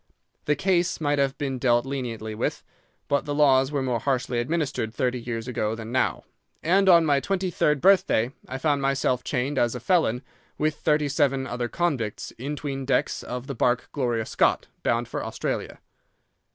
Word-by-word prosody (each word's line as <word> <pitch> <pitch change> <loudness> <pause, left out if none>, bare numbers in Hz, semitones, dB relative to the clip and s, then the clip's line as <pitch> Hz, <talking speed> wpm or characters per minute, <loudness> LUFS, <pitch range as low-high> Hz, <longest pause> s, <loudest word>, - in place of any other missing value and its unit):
The 150 - +2
case 175 +2 +1
might 145 -2 +1
have 140 0 +1
been 135 -3 -3
dealt 120 -1 +3
leniently 120 -5 -4
with, 105 - -2 0.4
but 140 - +1
the 145 -1 -2
laws 135 -2 +4
were 140 -2 -1
more 125 -3 0
harshly 125 -1 -1
administered 135 -4 -1
thirty 125 -2 0
years 115 0 -4
ago 110 -3 -1
than 115 0 -7
now, 130 - 0 0.4
and 190 +4 +4
on 170 -2 +7
my 145 -2 +3
twenty 190 +3 -1
third 150 -4 +1
birthday 180 - +4 0.2
I 130 - -4
found 145 0 +1
myself 135 -2 +1
chained 135 +1 -1
as 120 0 +1
a - - -4
felon 125 -3 +1 0.3
with 155 +1 +1
thirty 150 -1 +1
seven 135 -1 +1
other 125 -1 -3
convicts 130 -8 -2
in 140 +4 -3
'tween 140 -2 -4
decks 130 -1 0
of 125 0 -6
the 140 - -5
barque 120 0 0
Gloria 120 -5 -1
Scott, - - +1 0.2
bound 120 0 0
for - - -4
Australia. - - -4
135 Hz, 180 wpm, -25 LUFS, 120-150 Hz, 0.4 s, on